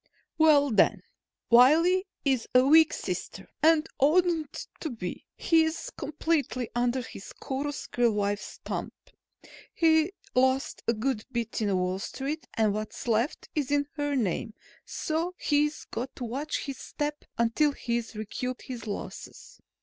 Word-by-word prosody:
"Well, 290 -3 +5
then, 215 - +3 0.5
Wiley 330 +10 +6 0.2
is 265 -4 +1
a 255 +1 +7
weak 315 +3 +7
sister - - -5
and 320 0 +4
oughtn't 320 +1 +2
to 315 - -3
be. 220 -8 -6
He's 325 +8 +1
completely 300 - -2
under 245 +1 0
his 195 - -10
chorus 280 +2 -4
girl 240 -1 +2
wife's 205 0 -2
thumb. - - -4 0.8
He 320 +1 +3 0.2
lost 260 +1 +1
a 230 - +4
good 225 0 -1
bit 235 -2 -2
in 200 -3 +1
Wall 180 +1 -1
Street 280 +9 -4
and 215 -2 +2
what's 215 +3 -5
left 230 +6 0
is 295 -5 -1
in 285 0 +2
her 290 -1 -1
name, 220 -1 -1 0.3
so 330 +3 -2
he's 295 0 +1
got 250 +3 -4
to - - -6
watch 270 +6 -3
his 275 -2 -6
step 295 0 -4
until 235 +6 +3
he's 235 -4 -3
recouped 245 +4 -4
his 235 -4 -7
losses. 205 - -7
265 Hz, 140 wpm, -28 LUFS, 230-310 Hz, 0.8 s, a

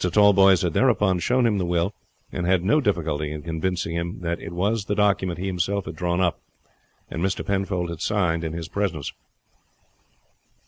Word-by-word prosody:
Tallboys 95 0 +5
had 85 -3 0
thereupon 105 -7 +3
shown 125 +8 +2
him 105 -4 +2
the - - 0
will, 85 +3 0 0.4
and 85 -1 -3
had 90 -1 +3
no 150 +11 +3
difficulty 80 - -1
in 75 -1 -6
convincing 85 +1 -2
him 85 +1 -4
that 85 0 -2
it - - -7
was 100 +4 0
the 105 - -1
document 100 -4 +1
he 90 - -4
himself 95 +1 -1
had - - -6
drawn 90 0 -1
up, 85 -2 0 0.7
and 80 - -4
Mr. 95 +1 -1
Penfold 95 -3 -1
had 85 -1 -7
signed 85 -6 0
in 80 -1 -3
his 85 -1 -5
presence. 85 -6 -2
90 Hz, 180 wpm, -24 LUFS, 85-100 Hz, 0.7 s, Tallboys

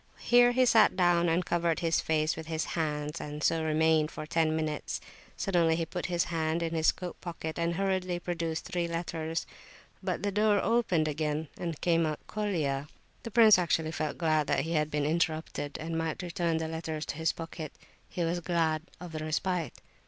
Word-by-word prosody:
Here 245 0 +5
he 255 +1 +4
sat 225 -5 +5
down 175 -2 +3
and 170 +2 +1
covered 170 -1 0
his 165 -1 +2
face 155 0 +1
with 160 0 -8
his 160 -1 -1
hands, 150 -1 -2
and 150 +1 -6
so 165 -1 +2
remained 160 0 +3
for 155 - -7
ten 160 0 +1
minutes. 155 -2 -2 0.4
Suddenly 170 -4 +2
he 165 0 -1
put 175 +2 -4
his 175 -1 +1
hand 160 +1 0
in 165 0 -2
his 160 -1 +4
coat 180 -1 -8
pocket 165 -2 -5
and 170 0 0
hurriedly 185 -1 0
produced 165 -2 -3
three 175 -1 -1
letters. 165 -1 -3 0.6
But 185 0 -2
the 205 - 0
door 210 0 +3
opened 195 -10 +2
again, 150 0 -2
and 170 -2 -4
out - - -19
came 165 -3 +2
Colia. 155 -10 -1 0.3
The - - -6
prince 220 -3 +7
actually 165 -2 +1
felt 155 -1 -3
glad 155 -3 +2
that - - +2
he 165 - -4
had 150 -2 +1
been 150 -1 -1
interrupted,—and 160 0 -2
might 165 +1 -2
return 170 -1 -1
the 160 0 -2
letters 160 -1 -4
to - - -5
his 160 -1 +1
pocket. 165 -2 -7 0.4
He 175 - -2
was 170 +1 0
glad 165 -2 0 0.2
of 180 -2 -8
the 155 - -4
respite. 160 -1 -2
165 Hz, 190 wpm, -30 LUFS, 155-175 Hz, 0.6 s, prince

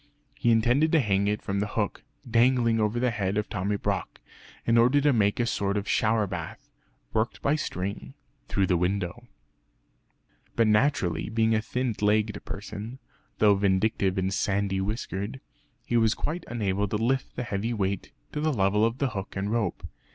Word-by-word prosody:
He 140 -4 0
intended 120 +7 +3
to 165 - +6
hang 100 -5 +1
it 105 +1 -1
from 100 -1 -1
the 105 - 0
hook, 105 -2 -1 0.3
dangling 115 -1 +3
over 110 +2 +1
the 125 0 +2
head 100 -3 -1
of 105 - -1
Tommy 100 +3 -1
Brock, - - -3 0.5
in 115 - +3
order 125 +5 +5
to 145 0 +3
make 105 -2 +2
a 120 - +2
sort 100 -3 -1
of 100 - -3
shower 110 -1 +2
bath, - - -7 0.4
worked 110 +1 0
by 140 - +3
a - - +1
string, 90 - -4 0.3
through 100 - +1
the 90 -1 +2
window. 95 +5 -2 1.3
But 115 - +4
naturally 105 - +2
being 110 0 +2
a 110 - +2
thin 125 +2 -2
legged 105 0 +1
person 105 +4 -7 0.4
(though 105 -1 +5
vindictive 95 0 +1
and 95 +1 0
sandy 100 -1 0
whiskered) 105 +2 -4 0.5
he 120 - +1
was 110 -1 +3
quite 165 +3 -3
unable 105 -3 -1
to 105 +1 -1
lift 130 +4 -1
the 125 - -3
heavy 105 +1 -2
weight 100 -4 -2 0.2
to 150 - -3
the 155 0 +2
level 105 -3 +2
of 115 +2 +1
the 140 -1 0
hook 100 -4 -6
and 100 +1 -2
rope. 110 -6 -1
105 Hz, 180 wpm, -27 LUFS, 100-120 Hz, 1.3 s, to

